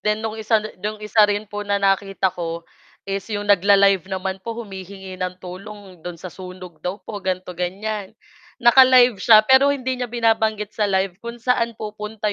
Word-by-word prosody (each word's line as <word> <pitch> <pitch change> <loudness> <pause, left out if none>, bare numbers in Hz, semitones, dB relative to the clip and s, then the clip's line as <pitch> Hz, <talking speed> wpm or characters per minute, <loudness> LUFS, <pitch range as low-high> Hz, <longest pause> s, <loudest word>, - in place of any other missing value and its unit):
then 210 +1 -1
no'ng 220 0 -4
isa 220 +1 +2 0.2
no'ng 210 +1 -4
isa 210 +1 +2
rin 205 +1 -1
po 205 0 -6
na 200 -1 0
nakita 195 -1 +1
ko, 170 -1 -5 0.4
is 195 0 -4
'yong 205 -1 -3
nag-la-live 195 -1 +4
naman 190 0 -4
po, 230 +3 -6
humihingi 190 -3 -9
ng 180 0 -3
tulong 190 0 -11
do'n 175 +1 -7
sa 175 +1 -9
sunog 180 -3 -11
daw 180 +4 -3
po 205 -2 -6
ganito, 185 -1 -3
ganiyan. 195 +4 -4 0.4
Naka-live 250 -2 +6
siya 215 -2 +7
pero 265 +3 +6
hindi 260 -2 -2
niya 245 - -2
binabanggit 220 -3 0
sa 210 -2 0
live 190 -1 -1
kung 235 0 -7
saan 235 -1 0
pupunta 210 0 -4
205 Hz, 175 wpm, -21 LUFS, 190-220 Hz, 0.4 s, siya